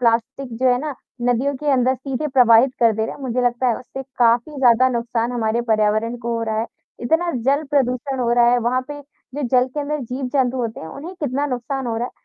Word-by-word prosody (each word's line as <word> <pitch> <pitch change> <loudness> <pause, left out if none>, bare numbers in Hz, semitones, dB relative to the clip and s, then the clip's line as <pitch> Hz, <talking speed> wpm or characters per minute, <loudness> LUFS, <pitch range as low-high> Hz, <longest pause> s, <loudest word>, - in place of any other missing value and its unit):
Plastic 235 +3 0
जो 260 0 +3
है 245 0 +3
ना, 300 -2 -4 0.3
नदियों 265 +4 +1
के 300 - -8
अंदर 260 0 +2
सीधे 270 +3 -4
प्रवाहित 250 -1 +5
कर 230 -2 +5
दे 220 +1 -1
रहे - - -6
हैं। - - -14
मुझे 250 -1 -1
लगता 245 +1 +1
है 230 - +1
उससे 265 +2 -8 0.2
काफ़ी 240 +5 +2
ज़्यादा 255 -1 +4
नुकसान 235 -1 -2
हमारे 230 -1 0
पर्यावरण 215 +2 +1
को 235 0 -2
हो 230 - -2
रहा 220 -1 -2
है, 225 - -2 0.3
इतना 325 +8 +1
जल 280 +3 +2
प्रदूषण 265 -1 0
हो 235 -1 +1
रहा 240 0 +5
है, 245 - +3
वहाँ 245 +2 0
पे 290 0 -7 0.3
जो 290 - -3
जल 250 - +4
के 295 - -1
अंदर 295 +1 -3
जीव-जंतु 255 +1 -1
होते 230 -3 -3
हैं, - - -8
उन्हें 320 - -8
कितना 285 0 -1
नुकसान 260 0 -3
हो 225 -1 -2
रहा 240 +2 -1
है। - - -10
250 Hz, 230 wpm, -20 LUFS, 235-270 Hz, 0.3 s, प्रवाहित